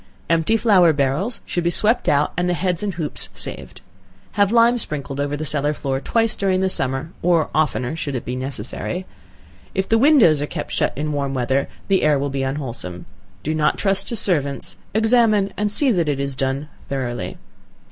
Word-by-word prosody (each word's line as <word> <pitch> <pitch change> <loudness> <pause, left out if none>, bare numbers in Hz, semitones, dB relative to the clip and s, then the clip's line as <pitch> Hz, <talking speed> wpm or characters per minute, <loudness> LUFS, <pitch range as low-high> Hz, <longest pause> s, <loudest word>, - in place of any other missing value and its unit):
Empty 165 +7 +3
flour 195 -7 +5
barrels 145 - -1
should 175 - -2
be 170 - +2
swept 215 +6 +2
out 145 +1 +2
and 180 +1 0
the 175 - +1
heads 180 +1 -1
and 200 -4 -2
hoops 160 -4 -3
saved. 65 -1 -8 0.5
Have 205 -1 +2
lime 235 +1 +4
sprinkled 140 - 0
over 145 +1 -2
the 155 - -4
cellar 150 0 +1
floor 135 -2 -2
twice 225 +5 +1
during 190 -2 +1
the 190 0 +1
summer, 135 +3 -1
or 170 -3 +2
oftener 145 -5 +1
if - - -4
it - - -6
should 140 -6 -4
be 125 - -3
necessary. 130 - -4 0.7
If 190 0 0
the 225 - +3
windows 235 - +5
are 145 - -2
kept 150 -1 -6
shut - - 0
in 150 +1 -2
warm 140 -2 -2
weather, 130 +2 0 0.2
the 195 -1 +3
air 150 -1 +3
will 140 0 -2
be 135 0 -2
unwholesome. 125 - -4 0.4
Do 155 - -1
not 155 -1 +1
trust 195 -1 +1
to 235 - -1
servants, 145 -10 0 0.2
examine 220 -3 +3
and 210 0 0
see 265 +5 +2
that 170 -7 +1
it 140 -2 -1
is 140 -1 -3
done 135 +3 -2 0.2
thoroughly. 120 -9 -3
155 Hz, 195 wpm, -21 LUFS, 140-195 Hz, 0.7 s, flour